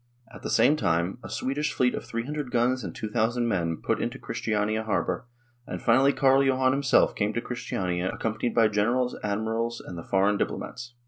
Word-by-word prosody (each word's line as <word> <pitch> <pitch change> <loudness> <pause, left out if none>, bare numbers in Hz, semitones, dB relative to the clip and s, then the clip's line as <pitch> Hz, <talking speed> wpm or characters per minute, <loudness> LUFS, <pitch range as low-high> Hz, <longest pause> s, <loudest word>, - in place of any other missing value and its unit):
At - - -11
the - - -4
same 150 - +4
time 85 - 0
a - - -8
Swedish 150 +3 -2
fleet 125 -1 +2
of - - -5
300 135 +4 -4
guns 125 +1 +1
and 85 -4 -6
2,000 115 +2 0
men 85 -6 0
put - - 0
into - - -3
Christiania 110 0 -1
harbour, 110 +2 -1 0.4
and - - -5
finally 130 +4 +4
Carl 135 -1 +4
Johan 130 -1 +3
himself 135 -1 +3
came 105 0 -1
to 120 - -1
Christiania 95 -8 -2
accompanied 110 +1 -2
by 115 -2 +5
generals, 120 +5 +1
admirals, 110 +3 -1
and 85 - -8
the - - -7
foreign 100 +2 +2
diplomats. 120 +3 -4
115 Hz, 180 wpm, -27 LUFS, 105-130 Hz, 0.4 s, by